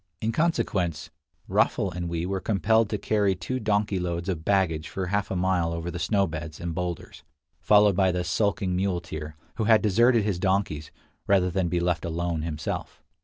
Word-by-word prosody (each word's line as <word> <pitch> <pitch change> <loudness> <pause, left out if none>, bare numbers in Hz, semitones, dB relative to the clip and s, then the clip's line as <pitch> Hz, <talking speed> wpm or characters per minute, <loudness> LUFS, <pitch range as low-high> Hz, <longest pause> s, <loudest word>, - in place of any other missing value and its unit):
In 110 - -1
consequence, 95 - -1 0.4
Raffl 95 - +1
and 85 0 -4
we 85 0 -2
were 95 +1 -2
compelled 110 +2 +2
to 105 - -1
carry 100 -2 +1
two 130 +9 -4
donkey 105 -3 0
loads 85 +1 -3
of 80 -4 -3
baggage 85 -5 +1
for 95 - -3
half 100 +3 -1
a - - -2
mile 90 -2 +1
over 85 +1 -4
the 90 - -5
snow 100 +1 +2
beds 80 -2 -6
and 85 -1 -4
boulders, 90 0 -5 0.4
followed 105 -2 +5
by 95 -1 +3
the 90 0 -1
sulking 95 0 0
muleteer, 85 -5 -3 0.2
who 110 - 0
had 110 0 +5
deserted 115 +3 +4
his 100 -4 -1
donkeys, 95 -6 0 0.4
rather 95 -2 +3
than 90 0 0
be 90 - 0
left 85 -2 0
alone 85 -1 -2
himself. 80 -1 -5
90 Hz, 180 wpm, -26 LUFS, 85-100 Hz, 0.4 s, followed